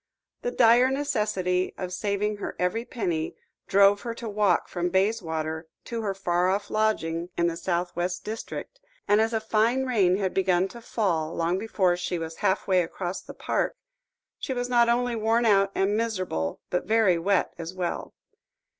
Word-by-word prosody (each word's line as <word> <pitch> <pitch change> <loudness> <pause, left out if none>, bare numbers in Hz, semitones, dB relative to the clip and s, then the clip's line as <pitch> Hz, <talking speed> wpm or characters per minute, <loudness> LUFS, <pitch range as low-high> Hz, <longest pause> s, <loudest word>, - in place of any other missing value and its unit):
The - - -1
dire 245 - +5
necessity 210 -10 0
of 185 -1 -4
saving 205 +2 -1
her - - -5
every 220 +6 -1
penny, 175 -11 -2 0.3
drove 200 +1 +5
her 230 -1 -4
to 230 0 -6
walk 205 -4 +2
from 175 0 -2
Bayswater 165 -5 -1 0.2
to 230 -2 -4
her 200 -3 -2
far 180 -1 +1
off 200 +2 -1
lodgings 175 -6 0
in 170 - +2
the 170 - +2
S.W. 175 +1 -1
district, 225 - -6 0.3
and 205 +1 +4
as 225 +1 +1
a 225 - +1
fine 225 +4 +1
rain 195 -8 +3
had 190 -2 -1
begun 185 -1 +2
to 235 - -11
fall 170 -9 -1
long 170 +3 0
before 195 -4 +1
she 180 0 -2
was 165 0 -6
half 195 -1 0
way 185 -2 +4
across 175 +2 -4
the - - -11
park, - - -1 0.6
she 265 - -3
was 245 0 -2
not 240 -1 +4
only 245 0 +1
worn 225 +2 +2
out 195 -2 +4
and 195 +2 +1
miserable, 185 - -2
but 180 - -1
very 215 -6 +3
wet 195 +3 +1
as 165 +2 -6
well. 180 -2 -4
195 Hz, 170 wpm, -26 LUFS, 180-225 Hz, 0.6 s, dire